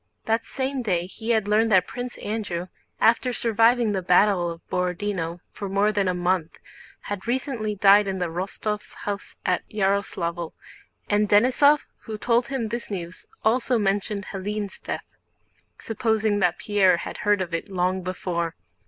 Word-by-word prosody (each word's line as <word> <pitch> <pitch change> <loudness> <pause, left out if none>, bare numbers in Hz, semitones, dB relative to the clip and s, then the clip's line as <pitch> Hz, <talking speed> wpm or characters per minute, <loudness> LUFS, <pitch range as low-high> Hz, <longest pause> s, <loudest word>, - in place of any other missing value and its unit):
That 225 +1 0
same 265 0 -2
day 180 -7 0
he 220 +5 -8
had 220 -3 +2
learned 220 +2 +3
that 185 -3 +5
Prince 245 0 -6
Andrew, 195 -5 -3 0.3
after 235 +2 +3
surviving 230 0 +3
the 195 -2 -1
battle 180 0 +4
of 165 0 -9
Borodinó 180 -2 -2
for 200 - -6
more 200 +2 +2
than 200 -2 +1
a 180 - +1
month 175 -2 0 0.4
had 205 +1 -6
recently 240 -4 -1
died 200 +1 +6
in 190 -1 -2
the 180 - 0
Rostóvs' 195 +5 -4
house 205 -1 -5
at 180 - +2
Yaroslávl, 190 -5 -1 0.5
and 210 0 +2
Denísov 260 +7 +5 0.2
who 220 -2 -5
told 235 +2 +2
him 260 -5 -2
this 235 +2 -4
news 180 -3 -6 0.2
also 245 +2 +3
mentioned 205 0 -1
Hélène's 200 +1 -4
death, - - -6 0.6
supposing 220 -2 0
that 180 -3 +2
Pierre 195 -4 +3
had - - -6
heard 205 -1 +2
of 180 -2 -3
it 165 +5 -3
long 185 0 0
before. 175 -2 -3
205 Hz, 155 wpm, -25 LUFS, 185-220 Hz, 0.6 s, died